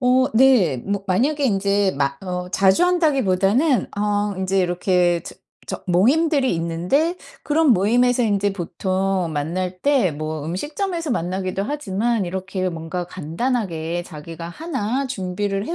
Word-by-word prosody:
어 255 0 +4
네. 220 - +5
뭐 200 +7 -3
만약에 280 +10 +1
인제 200 -3 +2
마 140 -1 -1
어 180 -1 -4
자주 195 - +4
한다기보다는 270 - +2
어 205 0 0
인제 190 +1 0
이렇게 175 -1 +1
저 - - -9 0.3
저 - - -5
모임들이 270 - +3
있는데 180 - 0 0.3
그런 310 +1 +2
모임에서 240 +5 +3
인제 205 -1 +1
보통 190 0 -1
만날 180 +5 -3
때 270 - +3
뭐 155 0 -4
음식점에서 310 - -3
만나기도 185 0 -2
하지만 225 -4 -1
이렇게 190 +1 -3
뭔가 165 +2 -4
간단하게 175 - -2
자기가 165 +1 -8
1 265 - -3
준비를 195 -2 -3
해 340 - -2
195 Hz, 285 characters per minute, -21 LUFS, 180-255 Hz, 0.3 s, 네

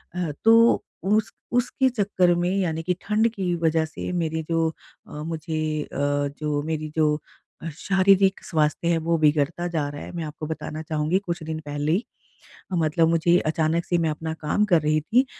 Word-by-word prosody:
अ, 175 -4 -1
तो 230 +1 +6 0.2
उस 215 +2 +2 0.2
उसके 245 +2 +2
चक्कर 200 -6 +2
में 175 +1 0
यानी 165 -4 -1
कि 180 - +1
ठंड 215 +2 +2
की 185 -5 -1
वजह 160 -1 +1
से 160 +3 -6
मेरी 160 -2 -1
जो 165 -1 +2 0.4
अ, - - -15
मुझे 155 -1 -2
अ, - - -9 0.4
जो 150 -1 -1
मेरी 155 0 -3
जो 155 -1 +2 0.6
शारीरिक 195 +1 +3
स्वास्थ्य 155 0 0
है 170 -1 +3
वो 165 +1 +1
बिगड़ता 155 +2 +1
जा 160 -4 -1
रहा 145 0 -8
है। - - -8
मैं 170 - -3
आपको 155 0 -6
बताना 155 0 -5
चाहूँगी 155 +3 0
कुछ 175 -3 -4
दिन 160 0 -4
पहले 145 +1 -2
ही 195 +9 +1 0.7
मतलब 165 -1 +2
मुझे 170 +1 +3
अचानक 160 +2 0
से 175 - +1
मैं 165 -2 +1
अपना 160 +1 -4
काम 160 +6 0
कर 175 -6 +3
रही 155 +1 +2
थी 235 - +2
165 Hz, 180 wpm, -24 LUFS, 155-180 Hz, 0.7 s, तो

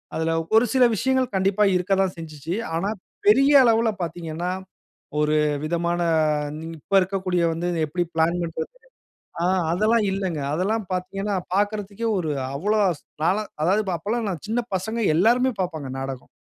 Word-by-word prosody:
அதில 160 0 0 0.2
ஒரு 225 +2 +6
சில 260 -1 +5
விஷயங்கள் 260 +2 +1
கண்டிப்பா 195 +2 +2
இருக்கதான் 190 +1 +1
செஞ்சிச்சு. 160 0 -6 0.2
ஆனா, 180 +5 -1 0.4
பெரிய 270 +7 +6
அளவுல 230 -1 +4
பார்த்தீங்கன்னா, 170 0 -4 0.7
ஒரு 150 0 +2 0.3
விதமான 170 +2 -1 0.5
இன் 155 +1 -7 0.2
இப்ப 200 - -5
இருக்கக்கூடிய 185 -2 -1
வந்து, 170 +2 -2 0.2
எப்பிடி 175 +4 -2
பிளான் 170 +2 +2
பண்றது 165 -1 -4 0.8
ஆ - - +2 0.3
அதெல்லாம் 215 +5 +2
இல்லங்க. 190 -5 -2
அதெல்லாம் 205 +7 0
பார்த்தீங்கன்னா 195 +3 -2 0.2
பார்க்கிறதுக்கே 205 +2 -1
ஒரு 160 -4 -1 0.2
அவ்ளோ 210 +9 +1 0.4
நான்லாம் 200 +4 +1
அதாவது, 195 +6 +3
அப்பல்லாம் 220 +7 -2
நான் 175 0 -6
சின்ன 230 +3 0
பசங்க, 220 +5 -2 0.2
எல்லாருமே 240 +9 +4
பார்ப்பாங்க 160 -7 -4
நாடகம். 135 -1 -6
185 Hz, 135 wpm, -23 LUFS, 165-215 Hz, 0.8 s, ஒரு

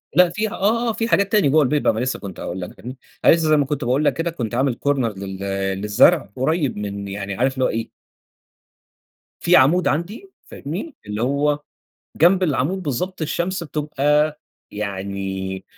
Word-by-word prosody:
لأ 180 -1 +6
فيها 215 +4 -2
آه، 230 +4 +1
آه - - 0
في 225 +1 -2
حاجات 200 -3 +2
تانية 205 -10 +4
جوّه 155 +2 +4
البيت 145 +2 0
ما 110 - +2
لسّه 130 +1 -2
كنت 95 -3 -8
هأقول 90 +2 -5
لك 90 - -7
فاهمني، 125 +2 -8 0.3
أنا - - +8
لسّه 160 -2 +1
زي 155 - +5
ما 145 - +2
كنت 145 0 -3
باقول 130 +5 +1
لك - - +3
كده 165 +1 -2
كنت 120 -7 -4
عامل 130 -1 +1
corner - - +6 0.3
لل 95 -1 -6 0.4
للزرع 105 - +4
قريّب 145 0 0
من 100 -1 -5
يعني 100 0 -5
عارف 130 +4 +1
اللي 130 -1 0
هو - - +1
إيه 115 0 -3 1.5
في - - +4
عامود 155 +7 +5
عندي 195 - -2 0.2
فاهمني، 185 - -6
اللي 105 +1 -4
هو 145 +2 +1 0.6
جنب 180 +4 +4
العامود 170 +3 0
بالضبط 170 +4 -3
الشمس 170 +3 -2
بتبقى 150 0 0 0.3
يعني 95 -2 -4
145 Hz, 180 wpm, -21 LUFS, 110-170 Hz, 1.5 s, أنا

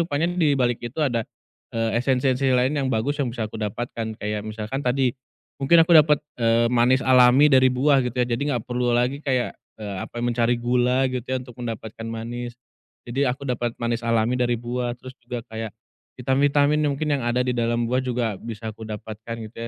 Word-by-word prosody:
rupanya 165 0 0
dibalik 140 -8 +1
itu 120 +3 -7
ada, 120 -5 0 0.5
eee 115 +1 +1
esensi-esensi 130 +1 +1
lain 125 +2 +2
yang 135 -1 0
bagus 140 +7 -1
yang 130 - 0
bisa 115 -2 -3
aku 110 - -9
dapatkan. 110 +1 -4
Kayak 105 0 -3
misalkan 110 +5 -4
tadi, 125 -1 +2 0.5
mungkin 165 +5 +5
aku 170 - +1
dapat, 150 -1 +6 0.2
eee, 115 0 +3
manis 125 +2 +3
alami 130 +3 +6
dari 130 0 +6
buah 135 +2 +3
gitu 125 0 -4
ya, 120 - +2
jadi 120 +4 -1 0.2
gak 110 - -9
perlu 125 0 0
lagi 125 +4 +1
kayak, 130 -3 0 0.2
eee, 105 -2 -5
apa, - - -9
Mencari 120 0 +1
gula 125 +2 +2
gitu 125 -2 -4
ya 130 0 -1
untuk 125 -2 -13
mendapatkan 115 -1 -6
manis. 120 +2 -5 0.5
Jadi 135 +3 0
aku 130 +3 -3
dapet 120 -2 -2
manis 120 0 -2
alami 115 +1 +2
dari 120 -1 +1
buah. 120 +1 -3
Terus 130 +1 -11
juga 120 -1 -5
kayak, 110 -1 -6 0.5
vitamin-vitamin 145 +3 +2
yang 145 - +1
mungkin 155 0 -2
yang 140 - -2
ada 125 +1 +1
di 125 - 0
dalam 120 0 0
buah 130 - +2
juga 120 -4 -1
bisa 110 0 -6
aku 110 - -13
dapatkan 110 +1 -7
gitu - - -33
120 Hz, 190 wpm, -23 LUFS, 115-130 Hz, 0.5 s, dapat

